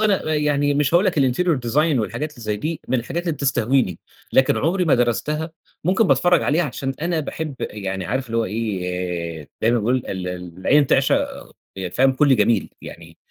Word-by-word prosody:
أنا 195 -7 +1
يعني 145 -1 +1
مش 145 +2 +1
هاقول 175 +3 +5
لك 180 - 0
الinterior 145 +4 +2
design 150 +1 +2
والحاجات 150 +7 -3
اللي 120 - -13
زي 105 -1 -2
دي، 155 +9 -4
من 130 - +1
الحاجات 145 +9 -3
اللي 170 -2 -1
بتستهويني، 130 - +1 0.3
لكن 130 0 +4
عمري 180 +4 +1
ما 160 - +4
درستها، 150 +7 0 0.3
ممكن 190 +5 +3
باتفرّج 175 -2 +3
عليها 155 +4 +2
عشان 135 -1 -4
أنا 170 -1 0
باحب 155 0 -5
يعني 95 -2 -4
عارف 130 +8 -2
اللي 115 0 -3
هو 115 - +2
إيه، 90 -6 -3
زي 110 - +4
ما 120 - +2
باقول 120 +4 +1
ال 95 -1 -4
العين 90 - +1
تعشق 135 +1 +2 0.5
يع 95 -1 -4
فاهم 130 +9 +3
كلّ 135 0 +4
جميل، 105 -1 +2
يعني 85 0 -11
130 Hz, 185 wpm, -21 LUFS, 105-155 Hz, 0.5 s, هاقول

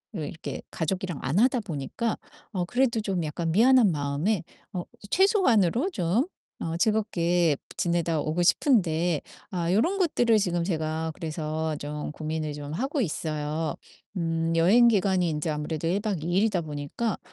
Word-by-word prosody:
으 - - -3
이렇게 160 +2 -5
가족이랑 180 -1 -2
안 140 +7 -1
하다 250 +1 +4
보니까 200 - -3 0.3
어 185 -5 -1
그래도 245 +3 +1
좀 195 -5 -1
약간 160 +2 -2
미안한 240 0 +6
마음에 150 +7 0 0.3
어 180 -2 -2 0.3
최소한으로 350 - +3
좀 195 - +1 0.3
어 165 0 -3
즐겁게 175 -5 +2
브 - - -13
지내다 170 -2 +1
오고 155 +4 -1
싶은데 175 - +2 0.3
아 175 -2 -1
요런 330 - +2
것들을 240 - +3
지금 175 -4 0
제가 160 -2 -2
그래서 155 -1 -3
좀 150 0 -5
고민을 155 0 -3
좀 145 0 -6
하고 270 - -1
있어요. 155 -4 -2 0.4
음. 165 -1 0
여행 200 +9 +6
기간이 190 -5 +2
인제 155 0 -2
아무래도 150 +1 -3
1 185 +4 +1
박 200 -7 -2
2 165 - -3
일이다 195 -1 +2
보니까 150 +8 -3
170 Hz, 310 characters per minute, -27 LUFS, 155-215 Hz, 0.4 s, 미안한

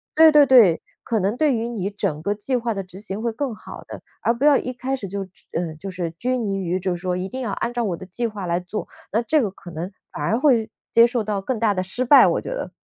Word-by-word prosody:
对 320 0 +8
对 300 -1 +7
对， 235 -11 +6 0.2
可 225 - 0
能 200 +4 0
对 300 0 +2
于 230 0 -1
你 205 -5 -3
整 160 -7 -3
个 200 +5 0
计 215 +6 -2
划 235 -2 -1
的 195 - -3
执 185 +1 -12
行 210 0 -5
会 235 - 0
更 270 0 -3
好 215 - -10
的。 - - -8 0.2
而 235 - +3
不 245 +5 -1
要 295 -1 +7
一 255 - -3
开 255 +2 -3
始 215 -7 -6
就， 200 0 -4 0.3
嗯， 165 -2 -3
就 195 +5 -6
是 180 -2 -3
拘 250 +9 -1
泥 200 -4 -1
于 185 -1 -1
就 185 -1 -1
说 180 +1 -2
一 185 +1 -3
定 260 +7 -6
要 230 -5 -2
按 235 +4 -2
照 240 -1 -1
我 180 -6 -2
的 - - -9
计 195 +6 -4
划 210 -4 -6
来 175 0 0
做， 195 +4 -5 0.2
那 225 +3 +2
这 295 +6 +2
个 210 -6 -1
可 180 -2 -12
能 165 +4 -5 0.2
反 145 - -5
而 220 +9 +1
会 250 -6 +3 0.2
接 230 - +7
受 240 -1 0
到 205 -2 -2
更 230 +3 -2
大 215 -3 +3
的 185 -1 -1
失 245 +7 -2
败， 280 +3 +8
我 - - +2
觉 - - -7
得。 - - -4
215 Hz, 300 characters per minute, -22 LUFS, 185-245 Hz, 0.3 s, 对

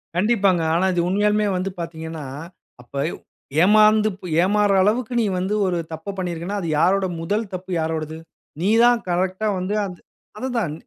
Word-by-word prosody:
கண்டிப்பாங்க. 195 -2 +2
ஆனா 180 +3 +2
இது 175 - +1
உண்மையாலுமே 210 +2 +2
வந்து 185 +2 -2
பார்த்தீங்கன்னா, 160 -2 -6 0.6
அப்ப 125 - -23 0.2
ப் - - -11 0.4
ஏமாந்து 215 +2 +5
ப் 185 - -8 0.2
ஏமாறுற 205 +1 +3
அளவுக்கு 230 +4 0
நீ - - +1
வந்து 190 +3 -1
ஒரு 180 -2 0 0.2
தப்ப 180 +5 -6
பண்ணியிருக்கன்னா, 180 +2 -3
அது 170 - -4
யாருட 190 +4 +3 0.2
முதல் 205 +7 -1
தப்பு 185 +1 -6
யாரோடது? 160 -1 -3 0.4
நீ 190 - +1
தான் 240 0 +5
கரெக்ட்டா 185 +4 0
வந்து, 185 +3 -2
அந்த 180 -3 -8 0.4
அதுதான். 235 - -2
190 Hz, 155 wpm, -22 LUFS, 175-210 Hz, 0.6 s, ஏமாந்து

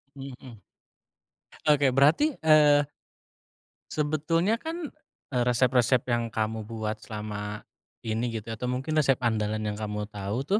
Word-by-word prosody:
Mhm. 130 -3 -9 1.1
Oke 140 -3 +4
berarti, 155 - +4
eee 150 -2 +5 1.0
sebetulnya 165 +8 +1
kan, 325 -1 -5 0.4
eee, 125 -1 +2
resep-resep 125 0 +3
yang 120 -1 +1
kamu 110 -1 -3
buat 110 -1 -4
selama 105 -1 -6 0.4
ini 115 +2 -1
gitu 110 +2 -9
ya - - -3
atau 125 - -2
mungkin 135 +5 -3
resep 135 -3 +4
andalan 110 -2 0
yang 105 -1 -2
kamu 105 0 -3
tahu 100 +2 -4
tuh, 200 +8 +1
125 Hz, 130 wpm, -27 LUFS, 110-150 Hz, 1.1 s, eee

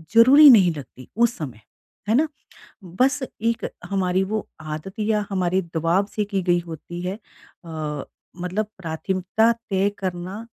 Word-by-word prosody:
ज़रूरी 275 +6 +9
नहीं 190 -8 +7
लगती 130 -3 -10
उस 235 +1 +2
समय। 130 -8 -7 0.5
है 225 - +4
ना? 305 +5 +3 0.6
बस 255 +11 +1 0.2
एक 230 +1 0 0.3
हमारी 190 -1 +1
वो 215 +1 -3
आदत 155 +5 -6
या 210 -1 +1
हमारी 185 -1 +1
दवाब 170 +5 +2
से 210 0 -2
की 195 -2 -2
गई 175 -1 +2
होती 170 +1 -8
है 180 +1 -2
अ, 155 -8 -8 0.4
मतलब 195 +4 -1
प्राथमिकता 190 +6 0 0.2
तय 195 +1 +2
करना 185 +4 -5
190 Hz, 140 wpm, -23 LUFS, 175-215 Hz, 0.6 s, ज़रूरी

